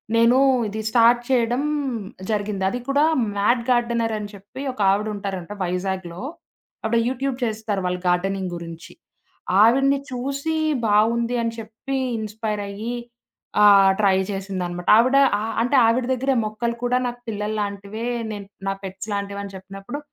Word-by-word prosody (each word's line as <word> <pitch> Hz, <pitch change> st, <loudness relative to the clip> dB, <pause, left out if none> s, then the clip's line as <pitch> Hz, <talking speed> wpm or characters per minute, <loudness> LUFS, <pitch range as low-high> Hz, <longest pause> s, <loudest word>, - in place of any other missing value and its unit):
నేను 230 Hz, +2 st, +5 dB, 0.3 s
ఇది 210 Hz, +1 st, -5 dB
స్టార్ట్ 240 Hz, +1 st, +5 dB
చేయడం 245 Hz, 0 st, +2 dB, 0.7 s
జరిగింది. 205 Hz, -2 st, -1 dB
అది 245 Hz, -, -3 dB
కూడా 280 Hz, +2 st, +3 dB, 0.3 s
మ్యాట్ 235 Hz, +4 st, +3 dB
గార్డెనర్ 235 Hz, -2 st, +1 dB
అని 205 Hz, -1 st, -6 dB
చెప్పి 205 Hz, +7 st, -10 dB
ఒకావిడ 205 Hz, -1 st, +2 dB
ఉంటారంట 195 Hz, -2 st, -5 dB
వైజాగ్‌లో. 180 Hz, 0 st, -3 dB, 0.6 s
ఆవిడ 230 Hz, +1 st, +2 dB
యూట్యూబ్ 265 Hz, 0 st, -2 dB
చేస్తారు 215 Hz, -3 st, -2 dB
వాళ్ళు 180 Hz, 0 st, -2 dB
గార్డెనింగ్ 185 Hz, +1 st, 0 dB
గురించి. 170 Hz, -1 st, -9 dB, 0.7 s
ఆవిడ్ని 270 Hz, +4 st, +4 dB
చూసి 275 Hz, +5 st, -2 dB, 0.3 s
బావుంది 230 Hz, +3 st, +2 dB
అని 230 Hz, 0 st, -1 dB
చెప్పి 225 Hz, +5 st, -5 dB, 0.2 s
ఇన్స్‌పైర్ 215 Hz, -1 st, -3 dB
అయ్యి. 215 Hz, +4 st, -4 dB, 0.7 s
ఆహ్, 200 Hz, -2 st, +7 dB
ట్రై 195 Hz, -2 st, +4 dB
చేసిందనమాట. 185 Hz, -3 st, -4 dB
ఆవిడ 255 Hz, +4 st, +4 dB, 0.2 s
ఆహ్, 220 Hz, +1 st, -3 dB
అంటే 250 Hz, +4 st, +1 dB
ఆవిడ 240 Hz, +2 st, +2 dB
దగ్గరె, 265 Hz, +2 st, 0 dB
"మొక్కలు 215 Hz, +2 st, -2 dB
కూడా 245 Hz, +1 st, +2 dB
నాకు 245 Hz, 0 st, -4 dB
పిల్లలు 210 Hz, 0 st, -3 dB
లాంటివే 200 Hz, +2 st, -5 dB, 0.3 s
నేను 205 Hz, -2 st, -7 dB, 0.2 s
నా 195 Hz, -, +2 dB
పెట్స్ 190 Hz, +2 st, -6 dB
లాంటివని" 200 Hz, 0 st, -4 dB
చెప్పినప్పుడు, 195 Hz, +8 st, -8 dB
215 Hz, 135 wpm, -23 LUFS, 195-240 Hz, 0.7 s, ఆహ్